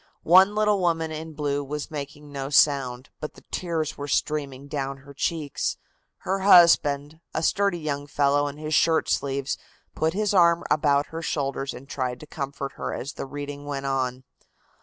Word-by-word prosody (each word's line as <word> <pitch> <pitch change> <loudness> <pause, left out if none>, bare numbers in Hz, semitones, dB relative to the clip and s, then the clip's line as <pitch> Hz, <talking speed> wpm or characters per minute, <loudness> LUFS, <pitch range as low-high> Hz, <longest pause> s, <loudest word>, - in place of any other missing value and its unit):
One 190 +4 +6
little 210 -1 +3
woman 165 -3 0
in 160 +1 -6
blue 145 -1 -1
was 150 +2 -5
making 145 0 -7
no 135 -1 -4
sound, 135 -2 +2
but 150 - -6
the - - -16
tears 165 -5 -2
were 145 - -4
streaming 140 -2 -1
down 140 -2 -3
her 140 - -12
cheeks. 150 0 -2 0.4
Her 190 +1 -1
husband, 160 -5 +5 0.2
a 160 - 0
sturdy 200 0 +2
young 145 -3 -3
fellow 145 0 +2
in 145 0 -6
his 155 0 -4
shirt 160 +2 +3
sleeves, 135 0 -1 0.3
put 160 +1 0
his 210 0 +1
arm 170 -2 +5
about 145 -1 +3
her 165 - -4
shoulders 140 -3 -2
and 135 - -10
tried 125 -3 -3
to - - -9
comfort 140 -2 -5
her - - -3
as 140 +4 -5
the - - -6
reading 145 +1 -6
went 140 -1 -3
on. 130 -1 -1
145 Hz, 175 wpm, -25 LUFS, 140-160 Hz, 0.4 s, One